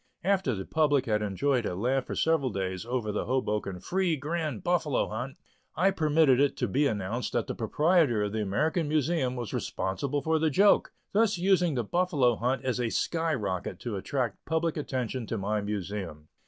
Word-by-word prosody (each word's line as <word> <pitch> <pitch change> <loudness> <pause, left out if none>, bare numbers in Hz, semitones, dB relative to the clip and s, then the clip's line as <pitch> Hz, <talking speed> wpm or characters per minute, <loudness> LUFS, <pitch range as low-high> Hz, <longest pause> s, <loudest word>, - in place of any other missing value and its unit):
After 190 - +1
the 95 -1 -5
public 145 -4 +2
had 105 -2 +1
enjoyed 120 +6 0
a 90 - -3
laugh 125 +7 0
for - - -4
several 160 -5 +2
days 95 0 -3
over 120 -4 -1
the 105 - -2
Hoboken 105 -7 -1
"Free 180 - 0
Grand 150 -4 -3
Buffalo 165 -6 +1
Hunt," 125 +5 -5 0.4
I 190 +3 +3
permitted 155 -6 +3
it 140 0 +2
to - - 0
be 145 +2 +2
announced 110 +2 -3
that 120 - 0
the - - -4
proprietor 150 - +2
of 105 - -2
the 110 0 -2
American 150 - 0
Museum 150 -4 +1
was 120 -3 -5
responsible 140 +9 -2
for 160 0 +2
the 160 0 +2
joke, 200 +8 +4 0.2
thus 215 -1 +2
using 180 -3 +2
the 120 - 0
buffalo 145 - +2
hunt 125 +5 -1
as 125 -1 0
a 120 -2 0
sky 165 +5 0
rocket 95 -6 -3
to 120 -4 -4
attract 120 +3 -2
public 160 0 0
attention 130 -5 -3
to 115 - -2
my 105 +2 -1
Museum. 100 -6 -5
130 Hz, 185 wpm, -28 LUFS, 105-160 Hz, 0.4 s, joke